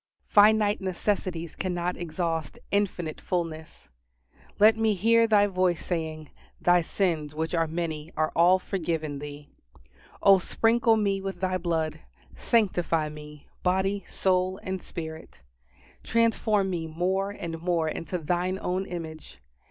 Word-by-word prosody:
Finite 210 Hz, -1 st, +4 dB
necessities 185 Hz, -3 st, -2 dB
cannot 180 Hz, -1 st, -2 dB
exhaust 165 Hz, -2 st, -3 dB
Infinite 185 Hz, -6 st, -1 dB
fullness. 165 Hz, -3 st, -4 dB, 0.7 s
Let 215 Hz, +1 st, +6 dB
me 220 Hz, -1 st, +1 dB
hear 230 Hz, +4 st, +4 dB
Thy 210 Hz, -2 st, +5 dB
voice 185 Hz, -4 st, 0 dB
saying, 160 Hz, -3 st, -4 dB, 0.3 s
"Thy 175 Hz, 0 st, +4 dB
sins, 160 Hz, -4 st, -1 dB
which 160 Hz, +2 st, -2 dB
are 165 Hz, -1 st, +2 dB
many, 160 Hz, -1 st, -4 dB
are 155 Hz, 0 st, +1 dB
all 175 Hz, +2 st, +6 dB
forgiven 160 Hz, -6 st, -3 dB
thee!" 145 Hz, 0 st, -9 dB, 0.8 s
O 195 Hz, -1 st, +7 dB
sprinkle 225 Hz, +4 st, +2 dB
me 200 Hz, -2 st, 0 dB
with 195 Hz, -1 st, -5 dB
Thy 185 Hz, 0 st, 0 dB
blood; 165 Hz, -3 st, -1 dB, 0.4 s
sanctify 175 Hz, -8 st, +1 dB
me, 150 Hz, -1 st, -11 dB
body, 190 Hz, +2 st, +1 dB
soul, 185 Hz, 0 st, 0 dB
and 190 Hz, -1 st, -4 dB
spirit. 160 Hz, -, -8 dB, 0.6 s
Transform 220 Hz, -4 st, +1 dB
me 165 Hz, -2 st, -3 dB
more 185 Hz, +5 st, -1 dB
and 170 Hz, -5 st, -6 dB
more 170 Hz, -2 st, +1 dB
into 165 Hz, +3 st, -3 dB
Thine 180 Hz, +3 st, -1 dB
own 185 Hz, +2 st, -2 dB
image. 160 Hz, -, -7 dB
180 Hz, 130 wpm, -27 LUFS, 160-195 Hz, 0.8 s, O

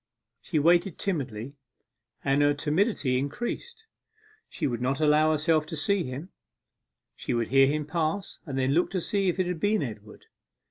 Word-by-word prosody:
She 160 Hz, -, -2 dB
waited 170 Hz, +3 st, +3 dB
timidly, 135 Hz, -, -3 dB, 0.7 s
and 140 Hz, +1 st, +3 dB
her 145 Hz, 0 st, +3 dB
timidity 150 Hz, -, +1 dB
increased. 240 Hz, -, -5 dB, 0.6 s
She -, -, -3 dB
would 120 Hz, -3 st, -2 dB
not 135 Hz, +3 st, 0 dB
allow 155 Hz, 0 st, +4 dB
herself 155 Hz, 0 st, +2 dB
to 160 Hz, -, -5 dB
see 195 Hz, +3 st, +1 dB
him 135 Hz, +8 st, -6 dB, 0.9 s
she -, -, -3 dB
would 115 Hz, -1 st, -1 dB
hear 135 Hz, 0 st, +6 dB
him 150 Hz, +1 st, -1 dB
pass, 165 Hz, +5 st, -2 dB
and 135 Hz, -2 st, -4 dB
then 130 Hz, 0 st, +1 dB
look 175 Hz, +4 st, +2 dB
to 185 Hz, -, +1 dB
see 195 Hz, +2 st, 0 dB
if 175 Hz, -, -1 dB
it 185 Hz, -, +1 dB
had 175 Hz, -2 st, -3 dB
been 205 Hz, 0 st, +1 dB
Edward. 105 Hz, -4 st, -9 dB
155 Hz, 170 wpm, -27 LUFS, 135-180 Hz, 0.9 s, hear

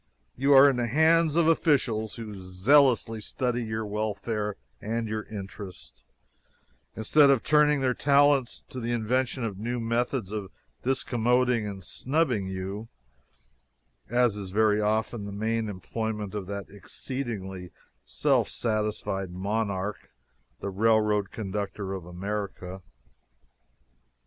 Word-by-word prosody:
You 140 Hz, +3 st, +3 dB
are 135 Hz, +1 st, +9 dB
in 135 Hz, -3 st, +2 dB
the 120 Hz, -1 st, 0 dB
hands 160 Hz, +4 st, +4 dB
of 170 Hz, -1 st, +4 dB
officials 130 Hz, -, +2 dB
who 110 Hz, -3 st, -7 dB
zealously 110 Hz, +5 st, +3 dB
study 125 Hz, +2 st, -2 dB
your 110 Hz, 0 st, -3 dB
welfare 105 Hz, 0 st, -2 dB, 0.3 s
and 115 Hz, +1 st, -2 dB
your 110 Hz, 0 st, -2 dB
interest, 95 Hz, -, -9 dB, 0.9 s
instead 140 Hz, +6 st, +5 dB
of 135 Hz, -4 st, +3 dB
turning 150 Hz, -1 st, +4 dB
their 130 Hz, -1 st, +2 dB
talents 140 Hz, -2 st, +3 dB
to 130 Hz, -, -6 dB
the 120 Hz, 0 st, -2 dB
invention 125 Hz, +3 st, 0 dB
of 100 Hz, -4 st, -3 dB
new 120 Hz, +3 st, -2 dB
methods 115 Hz, -2 st, -1 dB
of 105 Hz, -3 st, -4 dB, 0.3 s
discommoding 125 Hz, -2 st, +1 dB
and 95 Hz, -2 st, -8 dB
snubbing 130 Hz, -, 0 dB
you, 95 Hz, +3 st, -5 dB, 1.2 s
as 120 Hz, -3 st, +3 dB
is 100 Hz, -2 st, -6 dB
very 105 Hz, +1 st, +3 dB
often 110 Hz, +1 st, 0 dB
the 100 Hz, -, -6 dB
main 110 Hz, +2 st, -1 dB
employment 105 Hz, +1 st, -4 dB
of 100 Hz, -3 st, -4 dB
that 100 Hz, 0 st, -4 dB
exceedingly 100 Hz, -3 st, -5 dB, 0.3 s
self -, -, +1 dB
satisfied 105 Hz, -4 st, -2 dB
monarch, 100 Hz, +1 st, -3 dB, 0.5 s
the 100 Hz, -, -3 dB
railroad 105 Hz, 0 st, +2 dB
conductor 100 Hz, -2 st, -4 dB
of 95 Hz, -3 st, -6 dB
America. 95 Hz, 0 st, -5 dB
110 Hz, 120 wpm, -27 LUFS, 100-125 Hz, 1.2 s, are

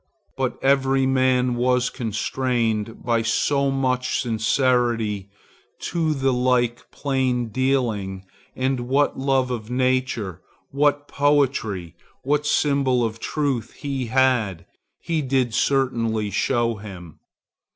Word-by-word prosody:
But 130 Hz, -2 st, -2 dB
every 135 Hz, 0 st, +3 dB
man 130 Hz, -1 st, +2 dB
was 125 Hz, +1 st, +1 dB
constrained 115 Hz, -1 st, -2 dB
by 115 Hz, -2 st, +2 dB
so 140 Hz, +5 st, +1 dB
much 130 Hz, -1 st, 0 dB
sincerity 115 Hz, -3 st, +1 dB, 0.5 s
to 160 Hz, -3 st, -1 dB
the 135 Hz, -1 st, +1 dB
like 125 Hz, -1 st, +1 dB
plaindealing, 125 Hz, -6 st, -1 dB, 0.3 s
and 130 Hz, 0 st, 0 dB
what 140 Hz, +2 st, +1 dB
love 130 Hz, -1 st, +1 dB
of 115 Hz, -2 st, -4 dB
nature, 125 Hz, -7 st, -1 dB, 0.3 s
what 145 Hz, +1 st, +1 dB
poetry, 135 Hz, -, 0 dB, 0.3 s
what 150 Hz, +2 st, 0 dB
symbol 140 Hz, -5 st, +2 dB
of 110 Hz, 0 st, -4 dB
truth 140 Hz, -7 st, -2 dB
he 135 Hz, -4 st, -4 dB
had, 115 Hz, -8 st, +1 dB, 0.4 s
he 165 Hz, -2 st, -1 dB
did 130 Hz, -4 st, 0 dB
certainly 115 Hz, -6 st, 0 dB
show 115 Hz, +2 st, 0 dB
him. 95 Hz, -6 st, -10 dB
125 Hz, 105 wpm, -23 LUFS, 115-135 Hz, 0.5 s, every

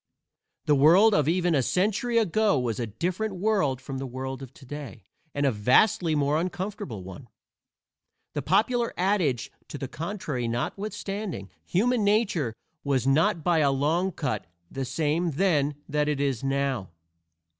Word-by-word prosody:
The 150 Hz, -, +4 dB
world 170 Hz, +10 st, +6 dB
of 150 Hz, -5 st, +2 dB
even 175 Hz, +1 st, +2 dB
a 140 Hz, -, +3 dB
century 215 Hz, -, +1 dB
ago 215 Hz, -3 st, +3 dB
was 120 Hz, -3 st, -1 dB
a 120 Hz, -, -2 dB
different 185 Hz, -, -2 dB
world 185 Hz, -, +1 dB
from 135 Hz, 0 st, -6 dB
the 135 Hz, -, -4 dB
world 130 Hz, +1 st, -5 dB
of 135 Hz, -2 st, -9 dB
today, 135 Hz, -5 st, -9 dB, 0.3 s
and 145 Hz, 0 st, +1 dB
a 135 Hz, -, +4 dB
vastly 155 Hz, -, +3 dB
more 145 Hz, +2 st, +2 dB
uncomfortable 180 Hz, -, -4 dB
one. 95 Hz, +8 st, -10 dB, 1.1 s
The -, -, -2 dB
popular 240 Hz, +1 st, +1 dB
adage 180 Hz, -, +1 dB, 0.2 s
to -, -, -7 dB
the 135 Hz, -, -4 dB
contrary 155 Hz, -, -4 dB
notwithstanding, 195 Hz, -, -4 dB
human 230 Hz, +5 st, +1 dB
nature 200 Hz, -, +1 dB, 0.3 s
was 135 Hz, -3 st, 0 dB
not 155 Hz, +3 st, +2 dB
by 175 Hz, -2 st, +3 dB
a 145 Hz, -2 st, +4 dB
long 160 Hz, +7 st, +1 dB
cut 110 Hz, -, -3 dB, 0.2 s
the 135 Hz, -1 st, -3 dB
same 160 Hz, +4 st, 0 dB
then 150 Hz, -4 st, +2 dB
that 150 Hz, 0 st, 0 dB
it 150 Hz, -2 st, 0 dB
is 135 Hz, -4 st, -1 dB
now. 135 Hz, -7 st, -1 dB
150 Hz, 150 wpm, -26 LUFS, 135-190 Hz, 1.1 s, world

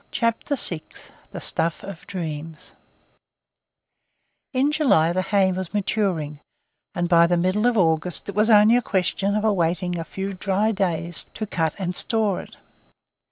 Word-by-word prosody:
CHAPTER 230 Hz, +4 st, -1 dB
VI 170 Hz, -, -1 dB, 0.5 s
THE -, -, -6 dB
STUFF 165 Hz, -1 st, -1 dB
OF 195 Hz, -4 st, -9 dB
DREAMS 160 Hz, -3 st, -6 dB, 1.8 s
IN 275 Hz, +1 st, +1 dB
July 210 Hz, -, +3 dB
the 185 Hz, -, +1 dB
hay 195 Hz, -1 st, +2 dB
was 185 Hz, +1 st, -5 dB
maturing, 185 Hz, -8 st, -1 dB, 0.6 s
and 175 Hz, 0 st, 0 dB
by 170 Hz, -1 st, +5 dB
the 175 Hz, 0 st, +1 dB
middle 185 Hz, +6 st, +1 dB
of 245 Hz, -2 st, +1 dB
August 165 Hz, -1 st, +1 dB
it 200 Hz, -, -4 dB
was 210 Hz, +3 st, +2 dB
only 215 Hz, +1 st, +6 dB
a -, -, +1 dB
question 195 Hz, 0 st, 0 dB
of 215 Hz, -, 0 dB
awaiting 180 Hz, -3 st, 0 dB
a -, -, -3 dB
few 195 Hz, +3 st, -5 dB
dry 195 Hz, +3 st, 0 dB
days 175 Hz, -4 st, -1 dB
to 215 Hz, -, -3 dB
cut 165 Hz, -6 st, -1 dB
and 180 Hz, -2 st, -3 dB
store 220 Hz, -4 st, 0 dB
it. -, -, -14 dB
185 Hz, 155 wpm, -23 LUFS, 170-210 Hz, 1.8 s, only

